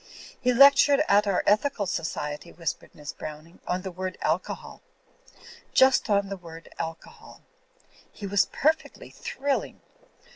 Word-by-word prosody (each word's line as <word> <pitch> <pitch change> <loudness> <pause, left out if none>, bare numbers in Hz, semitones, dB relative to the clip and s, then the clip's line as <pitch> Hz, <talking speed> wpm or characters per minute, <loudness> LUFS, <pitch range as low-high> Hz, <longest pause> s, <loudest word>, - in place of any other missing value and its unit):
"He 250 - +3
lectured 280 +3 +6
at 205 +1 +4
our 195 -2 +1
Ethical 210 +1 +2
Society," 155 -4 -4
whispered 165 -2 -5
Miss 150 -1 -8
Browning, 155 +3 -9
"on 180 0 -1
the 190 - -5
word 185 +1 -5
Alcohol. 165 +4 -3 0.9
Just 265 -2 +5
on 200 -1 +2
the 195 - -4
word 165 -2 -12
Alcohol. 165 0 -8 0.7
He 205 - -9
was 195 0 +2
perfectly 310 +2 -1
thrilling. 275 +1 -3
195 Hz, 125 wpm, -26 LUFS, 165-250 Hz, 0.9 s, lectured